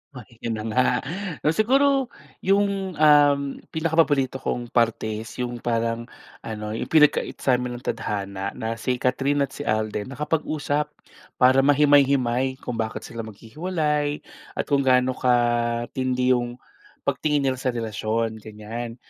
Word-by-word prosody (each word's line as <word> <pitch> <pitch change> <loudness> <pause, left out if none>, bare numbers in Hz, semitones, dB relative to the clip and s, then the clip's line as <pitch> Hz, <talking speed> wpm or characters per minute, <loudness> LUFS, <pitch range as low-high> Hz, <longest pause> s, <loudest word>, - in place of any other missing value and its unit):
Oh 125 - -8
di 115 0 -22
yun 115 -1 -3
na 110 - -5
nga. 130 +2 +3 0.7
Siguro 270 - +3 0.3
yung 195 -1 +1
um 145 -2 +6 0.4
pinakapaborito 155 -5 +2
kong 120 -2 -3
parte 110 -2 +1
is 115 - -9
yung 120 -1 -4
parang 115 0 -1 0.3
ano 105 -1 -6
yung 110 - -3
pinag-kait 150 -2 +3
sa'min 125 -1 +1
ng 120 - -10
tadhana 100 -3 -3
na 115 0 -4
si 125 +2 0
Kathryn 135 +3 +1
at 135 - -4
si 145 - -7
Alden 110 0 -1
nakapag-usap, 150 0 -1 0.5
para 130 +1 +5
mahimay-himay 135 -3 +3
kung 120 -2 -4
bakit 110 -1 -3
sila 115 - -9
maghihiwalay 150 - -2 0.3
at - - -1
kung 140 -1 +1
gaano 130 -1 +3
katindi 120 +1 +1
yung 120 -1 0 0.5
pagtingin 150 -2 0
nila 130 -2 0
sa 130 - 0
relasyon, 110 -1 -2
ganyan. 110 +2 -7
125 Hz, 135 wpm, -24 LUFS, 115-145 Hz, 0.7 s, um